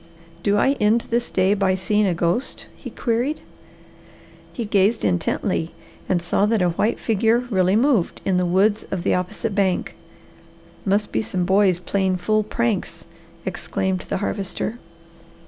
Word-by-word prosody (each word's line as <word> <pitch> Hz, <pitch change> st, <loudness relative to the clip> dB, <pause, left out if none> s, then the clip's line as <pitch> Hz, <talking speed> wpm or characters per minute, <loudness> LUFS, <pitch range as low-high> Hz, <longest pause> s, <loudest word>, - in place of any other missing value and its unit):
"Do 205 Hz, 0 st, +2 dB
I 270 Hz, -, +3 dB
end 215 Hz, +3 st, +3 dB
this 240 Hz, +1 st, 0 dB
day 190 Hz, +1 st, +2 dB
by 195 Hz, -2 st, +1 dB
seeing 205 Hz, +2 st, +1 dB
a 180 Hz, -, 0 dB
ghost?" 175 Hz, +9 st, -1 dB
he -, -, -9 dB
queried. 245 Hz, +6 st, -1 dB, 1.1 s
He 235 Hz, -, -4 dB
gazed 205 Hz, -, +2 dB
intently 100 Hz, -, -1 dB, 0.4 s
and 175 Hz, -2 st, +1 dB
saw 195 Hz, +4 st, +1 dB
that 220 Hz, -3 st, +2 dB
a 180 Hz, -, +3 dB
white 210 Hz, +7 st, 0 dB
figure 225 Hz, +1 st, +2 dB
really 190 Hz, -1 st, +3 dB
moved 235 Hz, -6 st, +2 dB
in 190 Hz, -2 st, +2 dB
the 180 Hz, -, +1 dB
woods 200 Hz, +4 st, +2 dB
of 185 Hz, -3 st, -3 dB
the -, -, +2 dB
opposite 180 Hz, +4 st, -2 dB
bank. 195 Hz, -2 st, 0 dB, 0.9 s
"Must 205 Hz, +2 st, +1 dB
be -, -, 0 dB
some 185 Hz, -4 st, -2 dB
boys 190 Hz, -1 st, +3 dB
playing 190 Hz, +1 st, 0 dB
fool 215 Hz, +4 st, +1 dB
pranks!" 225 Hz, 0 st, -2 dB, 0.4 s
exclaimed 190 Hz, -1 st, -2 dB
the -, -, 0 dB
Harvester. 205 Hz, +3 st, -3 dB
200 Hz, 150 wpm, -22 LUFS, 185-220 Hz, 1.1 s, I